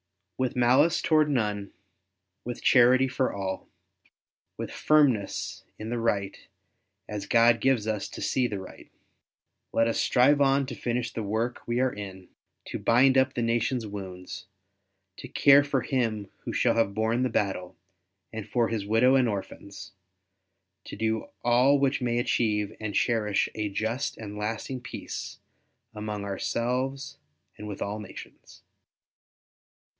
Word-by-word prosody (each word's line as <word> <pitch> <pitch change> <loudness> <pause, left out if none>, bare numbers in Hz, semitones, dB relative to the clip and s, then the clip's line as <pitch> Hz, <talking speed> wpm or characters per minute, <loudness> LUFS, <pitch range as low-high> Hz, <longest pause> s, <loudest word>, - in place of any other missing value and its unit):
With 130 -2 0
malice 130 +7 +4
toward 155 -2 +3
none, 105 -7 -1 0.7
with 120 +1 -6
charity 130 +1 +5
for 130 0 0
all, 95 -1 -4 0.9
with - - -5
firmness 135 -10 +1
in 110 +2 -6
the 120 - -1
right 100 -4 0 0.7
as 105 -2 -5
God 115 0 +5
gives 130 -5 +2
us 110 -2 -2
to - - -9
see 125 -2 +1
the 105 - -4
right, 95 - -12 0.8
let 115 - +2
us 115 - 0
strive 140 +4 +4
on 135 0 +3
to 130 - -6
finish 120 0 -3
the 115 - -3
work 110 +4 -2
we 120 +1 0
are 130 -1 +1
in, 95 -2 -9 0.4
to - - -5
bind 130 +3 +4
up 130 +1 +3
the 120 - 0
nation's 115 +1 0
wounds, 95 -2 -8 0.7
to - - -8
care 140 0 +6
for 140 -2 0
him 115 -6 -2
who - - -6
shall - - +2
have 105 -4 +1
borne 110 +3 +1
the 130 - +1
battle 95 -5 -2 0.6
and 110 -2 -6
for 120 -2 +1
his 110 -3 -2
widow 115 +5 +4
and 130 -3 +4
orphans, 100 0 -7 0.9
to - - -8
do 110 +1 -1 0.2
all 125 +4 +4
which 140 -1 +1
may 120 -1 0
achieve 105 -3 0
and 105 -2 -4
cherish 105 -4 +1
a 105 -1 -2
just 110 +6 -2
and 105 -2 -7
a - - -7
lasting 115 +4 -4
peace - - -7 0.6
among 105 -1 -5
ourselves 125 +7 -2 0.4
and 105 - -7
with 100 -2 -4
all 105 +2 -4
nations. 105 - -12
115 Hz, 150 wpm, -27 LUFS, 105-130 Hz, 0.9 s, care